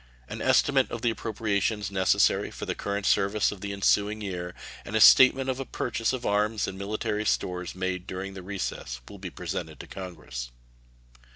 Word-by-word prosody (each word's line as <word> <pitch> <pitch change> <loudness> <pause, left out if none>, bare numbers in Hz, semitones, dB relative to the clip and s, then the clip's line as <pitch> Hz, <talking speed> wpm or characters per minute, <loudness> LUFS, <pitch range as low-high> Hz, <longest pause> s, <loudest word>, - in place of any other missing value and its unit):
An - - -6
estimate - - +3
of - - -6
the 120 - +3
appropriations 105 -2 -1
necessary 95 -2 +3
for - - -7
the - - -2
current 100 0 -3
service 100 +2 +2
of 100 -3 -9
the 100 -1 -4
ensuing 100 +2 +2
year 90 -4 -5 0.3
and 105 - -6
a - - +4
statement 130 +3 +7
of 130 0 -1
a - - -1
purchase 115 -3 -2
of 130 -2 -4
arms 105 +1 +1
and 95 - -5
military 105 +2 -2
stores 90 -4 -1
made 95 0 -3
during 95 +2 -5
the 95 - -8
recess 90 -10 -4
will 100 - -11
be 95 -1 -6
presented 85 -3 -5
to - - -8
Congress. 80 -10 -7
100 Hz, 180 wpm, -27 LUFS, 95-110 Hz, 0.3 s, statement